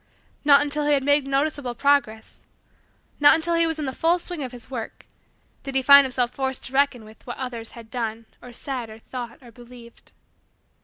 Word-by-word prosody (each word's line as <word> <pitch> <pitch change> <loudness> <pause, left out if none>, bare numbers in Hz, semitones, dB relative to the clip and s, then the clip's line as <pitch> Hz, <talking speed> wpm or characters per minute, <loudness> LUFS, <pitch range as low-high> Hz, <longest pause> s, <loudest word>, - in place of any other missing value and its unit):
Not 285 -1 +6
until 295 0 -2
he 295 - +4
had 275 -2 +1
made 285 0 +2
noticeable 275 -2 -1
progress 275 -6 0 0.8
not 290 +2 +7
until 330 +1 -1
he 335 0 +3
was 325 -1 -3
in 305 - -3
the 265 - -3
full 330 +5 +2
swing 350 -2 -5
of 260 -3 -4
his 245 -2 -9
work 235 -4 -7 0.6
did 275 -1 -7
he 265 - +2
find 280 +1 +8
himself 250 -2 -1
forced 265 0 -2
to 260 - -8
reckon 270 -4 +1
with 215 +3 -17
what 240 - -6
others 240 -3 -6
had 230 -2 -13
done 225 -2 -4 0.2
or 245 - -11
said 245 -1 -5
or 220 - -11
thought 235 +1 -8
or 240 - -14
believed. 240 0 -16
265 Hz, 200 wpm, -23 LUFS, 240-285 Hz, 0.8 s, find